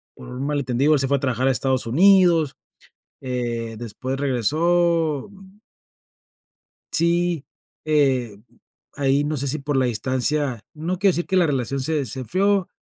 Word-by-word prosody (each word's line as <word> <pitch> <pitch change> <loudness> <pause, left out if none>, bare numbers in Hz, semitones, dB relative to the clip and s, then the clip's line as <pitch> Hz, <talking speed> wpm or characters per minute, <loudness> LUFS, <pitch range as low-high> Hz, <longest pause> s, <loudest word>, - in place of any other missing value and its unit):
por - - -12
un 125 +2 -5
mal 145 0 -1
entendido, 135 +3 +1
él 150 - +3
se 135 - +1
fue 140 - +3
a - - -5
trabajar 130 -1 -1
a - - +4
Estados 130 +1 0
Unidos, 170 +2 +4 0.7
eh, 120 -3 -3
después 120 +4 -5
regresó, 155 - +1
mm. 195 0 -17 1.4
Sí, 170 -2 +1 0.4
eh, 135 -8 +1 0.6
ahí 140 0 +1
no 150 +1 -2
sé 140 0 -2
si 145 +3 -1
por 145 0 -2
la 130 -1 +2
distancia, 130 +2 -1
no 165 +4 -3
quiero 195 +1 +4
decir 175 -1 -2
que 190 - -1
la 180 -2 +4
relación 135 -2 -2
se 150 +1 -1
se 130 - -6
enfrió, 190 - 0
140 Hz, 160 wpm, -22 LUFS, 130-170 Hz, 1.4 s, a